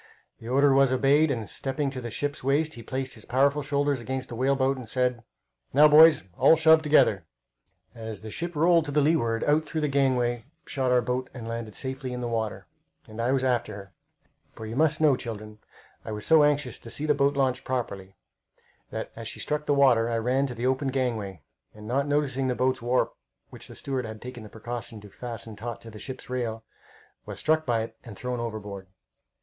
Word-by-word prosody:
The 115 - -10
order 140 +2 +4
was 135 -1 +4
obeyed, 140 +4 +3
and 115 -6 -2
stepping 135 +4 -2
to 130 -2 -6
the 120 - -5
ship's 145 +4 -3
waist, 150 +4 +1
he 120 - -9
placed 130 +2 -4
his 110 -4 -13
powerful 140 +3 +2
shoulders 145 -1 0
against 130 +2 -4
the 120 - -6
whale 135 +3 +2
boat, 135 0 +1
and 125 -4 -9
said: 125 -2 0 0.5
"Now, 150 +3 +8
boys, 155 - +7 0.2
all 140 +6 +7
shove 160 0 +6
together!" 110 - +3 0.7
As 110 -2 -7
the 110 0 -8
ship 170 +6 -5
rolled 165 +1 +4
to 145 - -5
the 150 - +2
leeward, 140 -7 +2
out 150 +2 +3
through 155 0 -4
the 150 - +1
gangway 125 -4 +1 0.2
shot 130 -2 -1
our 125 -1 +3
boat 125 +2 -2
and 115 -3 -7
landed 115 -2 -5
safely 130 -1 -4
in 125 - -4
the 120 - -3
water, 110 -2 -3 0.4
and 110 +1 -6
I 120 - 0
after 130 -5 0
her; 100 -1 -11 0.6
for 110 - -8
you 110 +1 -6
must 155 +2 +2
know, 150 -4 +5
children, 110 -3 -7 0.4
I - - -6
was 105 -1 -5
so 160 -2 +6
anxious 145 -4 +1
to 115 - -11
see 145 +6 -2
the 150 - +3
boat 140 0 +1
launched 130 -2 +1
properly 100 -7 -4 0.7
that - - -5
as - - -7
she - - -7
struck 150 0 -2
the 145 - +3
water 125 -5 +4
I 115 - 0
ran 130 +4 +1
to 125 - -6
the 120 +2 -3
open 130 +2 +1
gangway, 115 - -2 0.3
and 105 0 -11
not 135 +4 0
noticing 140 -2 0
the 125 - 0
boat's 130 0 0
warp, 120 +2 +1 0.4
which - - -10
the - - -11
steward 130 -3 -3
had 110 -1 -7
taken 125 0 -8
the 105 - -10
precaution 115 0 -7
to 105 -1 -13
fasten 115 -2 -7
taut 115 +3 -6
to 115 - -11
the 105 - -10
ship's 130 +3 -7
rail, 115 -3 -3 0.6
was - - -6
struck 155 -1 +1
by 115 -2 +1
it 115 0 -9
and 110 -4 -10
thrown 125 -1 -3
overboard. 105 -4 -6
130 Hz, 210 wpm, -26 LUFS, 115-140 Hz, 0.7 s, Now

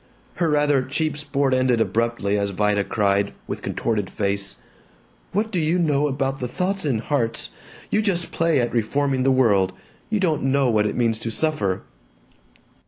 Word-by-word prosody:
Her 170 -2 +1
rather 145 -2 +3
cheap 155 +4 -1
sport 140 -2 0
ended 130 -2 +2
abruptly 115 -3 0
as 100 -1 0
Vida 105 +1 +1
cried, 100 -1 +1
with - - -5
contorted 105 -4 -2
face, 100 -1 0 0.8
"What 220 +3 -1
do 185 - 0
you 160 +2 +1
know 150 -4 +2
about 135 -1 -2
the 125 - -2
thoughts 185 +8 -2
in 135 -6 +1
hearts? 115 0 -2 0.4
You 215 - +3
just 185 -5 -1
play 165 -3 +2
at 120 -1 -1
reforming 135 +4 0
the 135 - +3
world. 100 -8 +3 0.4
You 215 - 0
don't 165 -6 +1
know 135 -2 +2
what 105 -1 +2
it 105 - -3
means 115 -2 +1
to 115 - -4
suffer." 110 -7 0
130 Hz, 170 wpm, -23 LUFS, 110-150 Hz, 0.8 s, rather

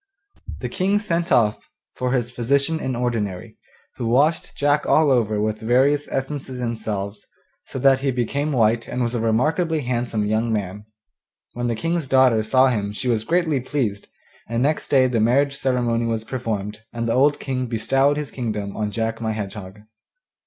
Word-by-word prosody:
The - - -2
King 190 +2 +1
sent 175 -5 -1
off 105 -2 +2 0.2
for 125 0 -2
his 125 -2 0
physician 140 +6 +1
in 130 -4 -2
ordinary, 115 -7 -3 0.4
who 120 - -2
washed 145 +7 +2
Jack 145 +1 +1
all 155 -2 +4
over 110 -4 +2
with 110 0 -1
various 135 +6 +2
essences 135 -1 -4
and 115 -2 -3
salves, 100 -1 -5 0.4
so - - -7
that 135 0 +4
he 135 +1 0
became 140 +4 -1
white 115 -3 +2
and 125 0 -2
was 120 0 -1
a 120 - -1
remarkably 155 +9 +1
handsome 120 -4 -1
young 110 +2 0
man. 105 -1 -3 0.7
When 120 0 -2
the 120 - 0
King's 165 +4 -2
daughter 130 -4 +4
saw 130 +5 +4
him 105 -4 -1
she 125 +4 -3
was 110 -2 +1
greatly 165 -3 +1
pleased, 120 -6 -2 0.4
and 115 +1 0
next 150 +2 0
day 130 -2 +4
the 120 -3 +1
marriage 140 +5 +2
ceremony 120 -3 0
was 115 -1 -2
performed, 110 -4 -4
and 115 0 -3
the 115 - +1
old 145 +3 +3
King 130 -2 -3
bestowed 135 +5 +1
his 150 -2 -4
kingdom 105 -5 -4
on 105 -1 -2
Jack 115 +1 -3
my 110 -1 -1
Hedgehog. 100 -1 -7
120 Hz, 175 wpm, -22 LUFS, 110-140 Hz, 0.7 s, all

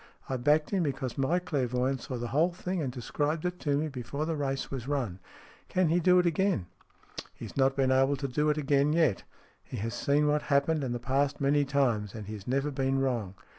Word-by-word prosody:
I 135 - -2
backed 150 +4 +2
him, 195 -3 +1
because 135 -5 -2
my 140 +6 +1
clairvoyant 130 -6 -1
saw 125 - -5
the 120 0 -4
whole 165 +7 +2
thing, 180 0 -3
and 135 -4 -2
described 145 +6 -2
it 180 0 -2
to 145 -2 0
me 155 +2 0
before 140 +2 -4
the 165 0 -1
race 135 -2 -2
was 130 -2 -5
run." 125 -11 -2 0.5
"tan 185 -3 +2
he 170 +2 +3
do 180 +1 +5
it 180 - +4
again? 175 - +1 0.2
" - - -32
" - - -9
He - - -8
has - - -10
not 135 0 +3
been 135 -1 +2
able 135 +2 +3
to 140 0 -3
do 150 +4 +1
it 150 - +1
again 145 0 +2
yet. 160 - +2 0.4
He - - -7
has 115 +3 -3
seen 145 +1 +2
what 150 0 +2
happened 145 +1 +1
in 130 - -2
the 120 - -1
past 135 +3 0
many 145 +1 +2
times, 120 -8 0
and 110 -2 -6
he 105 - -7
has 100 -2 -9
never 135 +3 0
been 135 0 0
wrong. 120 -8 -1
140 Hz, 235 wpm, -29 LUFS, 130-150 Hz, 0.5 s, do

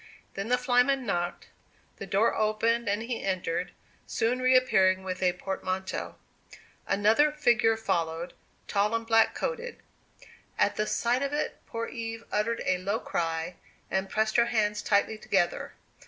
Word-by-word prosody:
Then 195 +2 -4
the 250 +1 +3
flyman 250 +1 +2
knocked; 175 -3 -2 0.5
the 200 - -7
door 200 +5 +2
opened, 220 +1 +1
and 205 +2 0
he 235 0 -4
entered, 180 -2 -2 0.4
soon 240 +2 0
reappearing 250 -8 +4
with 185 -1 -4
a 180 -1 +3
portmanteau. 190 0 -4 0.7
Another 220 +9 +4
figure 240 -6 +3
followed, 170 -5 -2 0.3
tall 210 +2 +1
and 230 0 -2
black 225 0 +4
coated. 485 -1 -3 0.8
At 205 - +2
the 210 +1 -1
sight 240 +2 +1
of 280 0 -2
it 295 - -2
poor 230 0 -3
Eve 225 -2 -6
uttered 225 +3 0
a 185 - +1
low 200 +4 -1
cry, 165 +1 -3 0.3
and 190 0 -1
pressed 220 +2 +1
her 235 0 +4
hands 210 -3 0
tightly 210 +1 +1
together. 190 -5 0
215 Hz, 145 wpm, -28 LUFS, 190-235 Hz, 0.8 s, reappearing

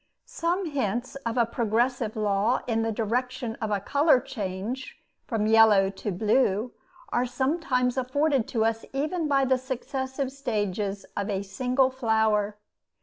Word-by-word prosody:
Some 350 +3 -1
hints 255 - -2
of 230 +2 -2
a 235 - +4
progressive 235 0 0
law 210 +3 +1
in 225 -2 0
the 225 0 0
direction 240 +2 -2
of 220 - -1
a 205 -1 +1
color 280 - +3
change 215 +2 -5 0.3
from 225 -4 0
yellow 215 -3 +6
to 200 +1 -4
blue 215 +3 +1 0.4
are 245 +1 0
sometimes 255 -1 0
afforded 265 0 +1
to 225 -2 0
us 225 0 0
even 310 +4 -1
by 275 -2 +3
the 260 0 +2
successive 260 +1 -3
stages 205 -7 -2
of 200 +1 -2
a 195 -1 -1
single 255 +6 +1
flower. 220 -4 +1
240 Hz, 145 wpm, -26 LUFS, 210-260 Hz, 0.4 s, yellow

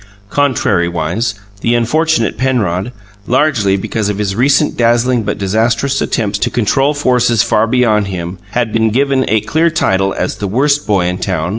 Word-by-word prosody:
Contrariwise, 100 - 0 0.2
the 115 +4 +1
unfortunate 120 0 +1
Penrod, 120 -6 -1 0.4
largely 125 -7 +2
because 105 +2 -2
of 105 - -2
his 100 -2 -2
recent 140 +5 +2
dazzling 120 +1 +2
but 105 -1 -3
disastrous 115 +7 0
attempts 105 -3 -1
to 120 - 0
control 135 +6 +1
forces 125 -5 +2
far 110 +1 +1
beyond 115 -4 +2
him, 90 -1 -5
had 120 -3 -1
been 110 0 +2
given 135 +3 +1
a 110 0 +2
clear 165 +8 +1
title 95 -11 0
as - - -3
the 100 - -3
Worst 140 +7 +1
Boy 100 -4 +2
in 90 +1 -2
Town. 90 -4 -2
115 Hz, 160 wpm, -14 LUFS, 100-130 Hz, 0.4 s, largely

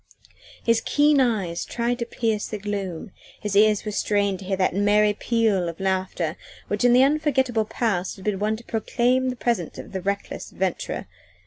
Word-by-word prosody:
His 230 -1 +3
keen 295 0 +3
eyes 200 -9 0
tried 240 +1 -2
to 235 - -3
pierce 220 -3 -1
the 215 - -4
gloom, 195 -3 -4 0.3
his 210 -1 -3
ears 210 0 +4
were 210 - -2
strained 200 -2 0
to 195 - -9
hear 190 0 -1
that 185 -2 +1
merry 205 +2 +3
peal 210 -5 +1
of 165 - -9
laughter 190 -3 -1 0.3
which 205 +2 -1
in 245 -1 +5
the 250 +1 +7
unforgettable 270 -6 +2
past 200 -5 -1
had 190 - -13
been 205 -3 0
wont 215 +1 0
to 235 - -14
proclaim 250 +3 +1
the 255 - -3
presence 235 -8 -1
of - - -9
the 190 - -4
reckless 200 +2 -4
adventurer. 185 -2 -2
210 Hz, 185 wpm, -24 LUFS, 195-235 Hz, 0.3 s, the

